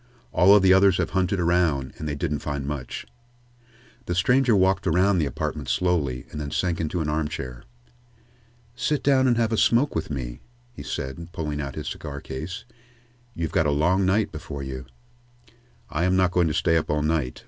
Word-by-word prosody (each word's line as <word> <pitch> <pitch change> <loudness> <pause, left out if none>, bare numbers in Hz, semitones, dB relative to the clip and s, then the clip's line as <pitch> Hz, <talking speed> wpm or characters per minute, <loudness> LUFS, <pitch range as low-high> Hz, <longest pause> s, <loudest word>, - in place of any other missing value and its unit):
"All 100 +3 +6
of 100 - +5
the 95 -1 +6
others 95 -1 +5
have - - -1
hunted 95 +1 0
around, 85 -6 +1
and 75 - -4
they 75 - -2
didn't 75 +1 -2
find 70 -2 -4
much." 70 -4 -5 1.0
The 90 - -1
stranger 125 +6 +3
walked 95 -1 +2
around 90 +3 +3
the 75 - +1
apartment 70 - -4
slowly, 75 -9 0
and 75 - -5
then 75 - -4
sank 85 +3 -1
into 80 +2 -2
an 75 - -2
armchair. 75 -5 -3 1.1
"Sit 150 +4 -1
down 135 -2 +4
and 120 -2 +3
have 115 -1 +1
a 110 - +1
smoke 120 +7 +3
with 80 - -3
me," - - -5 0.3
he - - -9
said, 70 +4 -5
pulling 75 -2 -3
out 70 -1 -5
his - - -5
cigar 70 -1 -6
case. 80 - -6 0.7
"You've 80 -2 -3
got 80 - +2
a - - +2
long 85 +7 +2
night 100 +3 +2
before 75 -2 -7
you." 65 -2 -6 1.0
"I 80 +3 0
am 90 0 +2
not 95 -1 +3
going 90 -2 +2
to 75 - -1
stay 80 -2 +2
up 80 - -2
all 75 0 +1
night. 75 -5 -1
80 Hz, 190 wpm, -25 LUFS, 75-95 Hz, 1.1 s, All